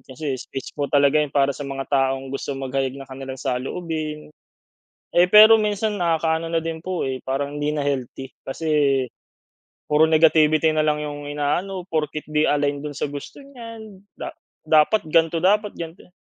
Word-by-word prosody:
kasi 135 +3 -5
speech 135 - -7
po 145 -1 -3
talaga 145 +1 +4
yun 150 - 0
para 140 0 +2
sa - - -12
mga 135 -1 -4
taong 135 0 0
gusto 135 0 -4
maghayag 135 0 -2
ng 135 - -8
kanilang 130 0 -7
saloobin. 150 +3 -4 0.8
Eh, 175 - +5
pero 215 +3 +9
minsan 210 0 -1
nakakaano 165 -2 0
na 165 - +2
din 165 0 -4
po 185 -2 -2
eh, 130 -1 -2
parang 140 +2 -2
hindi 150 +1 -1
na 150 - -1
healthy 135 -1 -3 0.2
kasi, 160 +4 -5 1.2
puro 155 +2 +5
negativity 155 0 +4
na 155 - +1
lang 150 0 +1
yung 145 0 -6
inaano, 175 +6 -2
porket 155 -1 -2
di 150 0 +2
align 145 -1 0
dun 150 0 -6
sa 145 - -2
gusto 145 - -9
niyan, 230 -7 -11 0.2
da - - -6 0.3
dapat 155 +7 +4
gan'to 165 +1 +2
dapat 210 +2 +2
gan'to 165 +1 -8
yan. 180 - -29
150 Hz, 170 wpm, -22 LUFS, 140-165 Hz, 1.2 s, pero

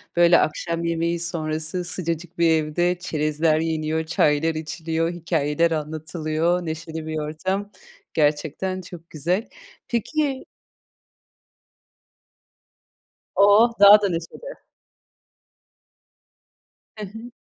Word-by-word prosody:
Böyle 175 0 +6
akşam 170 +2 -1
yemeği 170 0 0
sonrası 160 0 -3
sıcacık 170 0 -4
bir 170 -1 +4
evde 165 +3 +1
çerezler 155 0 0
yeniyor, 160 0 -1
çaylar 155 0 +2
içiliyor, 165 +1 -2
hikâyeler 165 -1 0
anlatılıyor, 155 +2 -1
neşeli 160 0 -5
bir 155 0 -3
ortam. 190 +7 -3 0.4
Gerçekten 160 +5 0
çok 170 -2 -12
güzel. 175 - -2 0.4
Peki 270 +3 -1 2.9
Oh! 205 +4 +6
Daha 205 +1 +9
da 200 - +1
neşeli. 175 - -7 2.3
Hı 210 - -5
hı. 225 +5 -10
165 Hz, 90 wpm, -23 LUFS, 155-180 Hz, 2.9 s, Daha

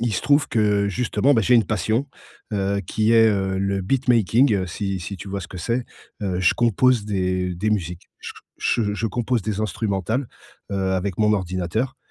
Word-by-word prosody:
il 120 -1 0
se - - -1
trouve 145 +3 +3
que 105 -2 +2
justement, 125 +5 +1
bah, 115 - +3
j'ai 125 - +3
une 115 -3 +5
passion, 110 +5 0 0.5
heu, 100 0 0
qui 110 +4 +1
est, 115 -1 +6
heu, 95 -2 0
le 100 0 -1
beatmaking, 120 +1 +3
heu, 95 -2 -1
si 95 +1 -3
si 95 +3 -6
tu 100 +2 -9
vois 100 0 -4
ce 90 - -9
que 95 - -9
c'est. 120 +7 -1 0.4
Heu, 95 -3 -1
je 95 - +4
compose 120 -1 +2
des 90 -2 -1
des 105 +5 -1
musiques. 90 -4 -3
Je - - -7 0.3
je 105 -3 0
je 115 +2 -2
compose 120 +1 -1
des 105 0 -3
instrumentales, 110 +4 -2 0.4
heu, 95 -1 0
avec 95 0 -2
mon 105 -1 +3
ordinateur. 95 +7 -2
105 Hz, 195 wpm, -22 LUFS, 95-115 Hz, 0.5 s, est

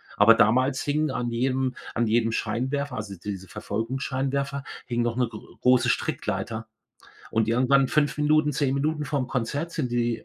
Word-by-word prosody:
Aber 115 - +7
damals 130 +5 +3
hingen 150 0 0
an 120 -2 -2
jedem 130 +1 0 0.2
an 115 -1 +1
jedem 115 +1 +2
Scheinwerfer 135 +4 -2
also, 105 -3 -5
diese 95 -2 -5
Verfolgungsscheinwerfer, 135 +6 -2 0.2
hing 120 0 -1
noch 120 0 -1
'ne 125 -1 +2
gr 110 -2 -9 0.2
große 125 -1 +4
Strickleiter. 110 -1 -2 0.6
Und 110 -1 +1
irgendwann 130 +3 +3
5 145 +1 +1
Minuten, 150 0 +3
10 135 -1 +1
Minuten 150 +2 0
vorm 140 -3 -1
Konzert 140 +7 -2
sind 125 -6 -2
die 120 -1 0
130 Hz, 160 wpm, -26 LUFS, 115-140 Hz, 0.6 s, Aber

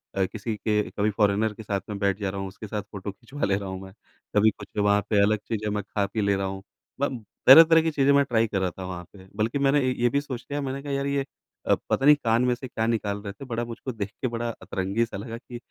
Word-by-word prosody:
अ, 95 - +2
किसी 110 +2 -4
के 105 0 +1
कभी 105 +1 0
फॉरेनर 105 +1 +2
के 110 - -10
साथ 100 -2 -2
में 105 - -3
बैठ 100 0 +1
जा 100 -2 -1
रहा 100 0 -5
हूँ, 95 - -3
उसके 100 +3 -9
साथ 105 0 -3
फ़ोटो 100 -1 -7
खिचवा 135 +8 -9
ले 100 -1 +2
रहा 100 -1 -4
हूँ 95 0 -6
मैं। 95 0 -10 0.4
कभी 110 +1 +6
कुछ - - -8
वहाँ 100 0 +3
पे 105 -2 +4
अलग 110 +1 +3
चीज़ें 105 -2 -2
मैं 105 -1 -2
ख़ा-पी 100 +1 -2
ले 100 0 +2
रहा 95 0 -1
हूँ। 95 0 -6 0.4
ब 130 -5 -1 0.2
तरह-तरह 165 +4 +10
की 160 0 0
चीज़ें 140 -1 +3
मैं 140 0 +5
ट्राई 115 -2 +2
कर 100 -2 -1
रहा 95 - +1
था 95 - -9
वहाँ 90 -1 -6
पे, 95 -1 -14
बल्कि 115 +6 0
मैंने 140 +1 +4
ए - - +1
ये 120 0 +3
भी 140 +3 +1
सोच 130 -4 -6
लिया। 145 - -1
मैंने 135 0 -3
कहा 145 - -5
यार 140 0 -1
ये 140 0 +1 0.5
अ, - - +5
पता 135 - +1
नहीं 150 0 +9
कान 115 +1 +3
में 125 - +3
से 130 +1 -8
क्या 110 -2 -2
निकाल 105 -3 -1
रहे 100 -1 -6
थे, 135 - -10
बड़ा 120 -1 -2
मुझको 120 +3 -6
देख 100 -3 -4
के 130 - +1
बड़ा 120 0 -3
अतरंगी-सा 100 +2 -2
लगा 115 +2 -6
कि 120 0 -9
110 Hz, 270 wpm, -26 LUFS, 100-125 Hz, 0.5 s, तरह-तरह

